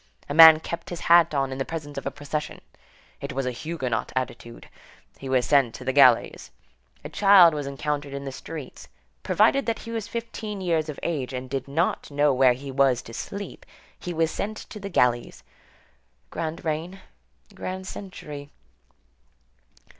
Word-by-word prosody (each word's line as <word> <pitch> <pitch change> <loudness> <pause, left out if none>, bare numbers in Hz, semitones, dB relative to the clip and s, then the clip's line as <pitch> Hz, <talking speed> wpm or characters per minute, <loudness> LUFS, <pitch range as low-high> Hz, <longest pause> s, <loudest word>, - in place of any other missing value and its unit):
A - - -4
man 160 0 +10
kept 170 +1 -6
his 175 - -6
hat 170 -1 +5
on 135 -1 0
in 130 - -5
the - - +1
presence 145 -1 -7
of - - -5
a - - +1
procession—it 150 +1 -8
was 135 0 -2
a 125 - -1
Huguenot 130 -2 -3
attitude; 120 -2 -5 0.5
he 135 - -7
was 130 -2 +2
sent 135 -5 +3
to 125 - -9
the 130 - 0
galleys. 130 -4 +4 0.6
A - - -5
child 195 -5 +6
was 145 -2 -4
encountered 145 +1 -3
in 140 0 -6
the 135 - -4
streets; 150 +1 -9 0.3
provided 275 -2 +2
that 230 - 0
he 230 - -9
was 225 -3 -4
fifteen 225 -3 -5
years 165 -4 0
of 150 - -6
age 140 -6 -2
and 130 0 -5
did 135 0 -3
not 160 +6 -1
know 145 0 +2
where 130 -1 +5
he 135 +2 -8
was 130 -2 +2
to 115 - -11
sleep, 200 - -7 0.4
he 180 - -5
was 165 -1 0
sent 215 +1 -4
to 210 - -7
the 200 0 -6
galleys. 120 - 0 0.9
Grand 165 +2 -5
reign; 165 +5 -3 0.5
grand 185 0 -6
century. 150 -8 -8
150 Hz, 170 wpm, -25 LUFS, 135-170 Hz, 0.9 s, man